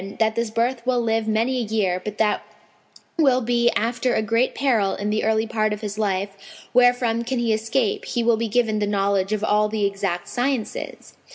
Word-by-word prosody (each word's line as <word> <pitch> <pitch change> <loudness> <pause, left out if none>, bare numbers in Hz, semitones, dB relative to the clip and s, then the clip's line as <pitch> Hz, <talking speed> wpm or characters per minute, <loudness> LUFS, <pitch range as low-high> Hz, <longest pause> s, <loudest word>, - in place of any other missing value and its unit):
that 220 -1 +2
this 235 0 -1
birth 235 +2 -1
will 250 -1 +1
live 225 -1 0
many 225 +4 +1
a 245 - 0
year; 205 -5 -1
but 210 0 -6
that 215 -1 +1 0.8
will 270 -5 +4
be 240 0 +2
after 240 +2 0
a - - +2
great 230 +4 +1
peril 230 -8 +1
in 205 +1 -3
the 215 - 0
early 220 0 +1
part 215 -1 0
of 210 - -6
his 210 0 -5
life, 195 -1 -1 0.4
wherefrom 245 -2 +3
can 255 +2 -2
he 235 -2 +1
escape, 220 +1 -1
he 240 - -1
will 235 0 +4
be 230 +1 -2
given 220 -1 +1
the 205 - 0
knowledge 200 -1 0
of 215 -1 -1
all 210 0 +2
the 210 -1 0
exact 195 -3 -2
sciences." 245 -2 -3
220 Hz, 200 wpm, -22 LUFS, 210-240 Hz, 0.8 s, will